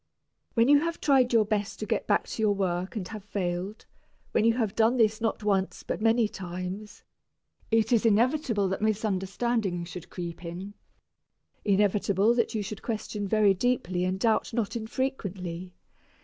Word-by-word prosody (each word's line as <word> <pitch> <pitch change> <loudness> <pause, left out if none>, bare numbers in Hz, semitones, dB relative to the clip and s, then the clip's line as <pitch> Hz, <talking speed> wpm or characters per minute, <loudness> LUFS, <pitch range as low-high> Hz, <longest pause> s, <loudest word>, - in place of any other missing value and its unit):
When 230 0 +4
you 290 +1 +7
have 335 +2 -2
tried 265 -4 +3
your 225 -3 +4
best 210 0 -2
to 215 - -4
get - - -1
back - - +2
to - - -4
your 210 -2 +3
work 185 +1 -2
and 195 -5 -3
have 215 -3 -7
failed, 190 0 -3 0.5
when - - +2
you 230 0 +5
have 220 -4 -1
done 230 +3 +3
this 220 -1 +3
not 225 -1 -1
once 195 -2 0
but - - -4
many 225 0 +3
times, 185 +2 -7 0.7
it 225 0 +2
is 235 -3 +4
inevitable 230 -1 +2
that 190 - -3
misunderstanding 205 -2 0
should 175 0 -9
creep 170 -1 -6
in, 180 +4 -6 0.9
inevitable 200 +1 +3
that 235 -1 0
you 210 - -1
should 200 0 -6
question 215 -2 -3
very 210 -1 +4
deeply 185 -4 0
and 185 +1 -1
doubt 225 +1 +1
not 225 -2 -1
infrequently. 200 -7 -4
210 Hz, 165 wpm, -28 LUFS, 190-230 Hz, 0.9 s, you